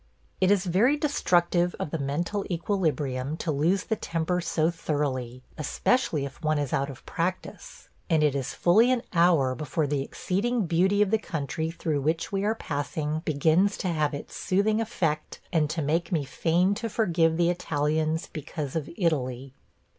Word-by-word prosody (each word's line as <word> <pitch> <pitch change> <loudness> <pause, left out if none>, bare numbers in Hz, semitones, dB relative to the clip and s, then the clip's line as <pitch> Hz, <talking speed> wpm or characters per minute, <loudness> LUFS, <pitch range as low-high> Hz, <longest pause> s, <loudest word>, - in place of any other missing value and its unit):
It 185 - +3
is 200 -1 +3
very 215 - +3
destructive 175 - +2
of 145 - -3
the 165 - -2
mental 170 +9 -2
equilibrium 155 -6 -1
to 165 - -2
lose 165 +7 +1
the 220 - -1
temper 175 -1 -1
so 170 -1 +1
thoroughly, 130 -6 -3 0.2
especially 155 - +1
if 140 +4 -10
one 155 -1 +1
is 145 -3 -2
out 140 +1 0
of 135 - -11
practice, 185 - -4 0.2
and 160 -3 +3
it 150 -2 +3
is 135 -3 -3
fully 220 +8 +4
an 250 -2 +1
hour 170 -7 +4
before 150 +2 -2
the 145 -1 -1
exceeding 205 - -1
beauty 190 +5 +3
of 205 - -3
the 220 - +3
country 160 -3 -3
through 160 -3 -2
which 160 +4 -1
we 195 0 -1
are 215 +2 +1
passing 150 -2 -3
begins 160 +7 +2
to 185 - -2
have 155 -3 0
its 145 - -8
soothing 215 +4 +1
effect 165 -9 -2
and 155 -3 +2
to 155 0 -2
make 165 +4 0
me 155 -5 0
fain 175 +7 +1
to 225 +3 -4
forgive 170 -7 +2
the 170 0 +3
Italians 155 -1 -1
because 150 -2 -5
of 155 -3 -2
Italy! 135 - -1
165 Hz, 170 wpm, -27 LUFS, 150-185 Hz, 0.2 s, fully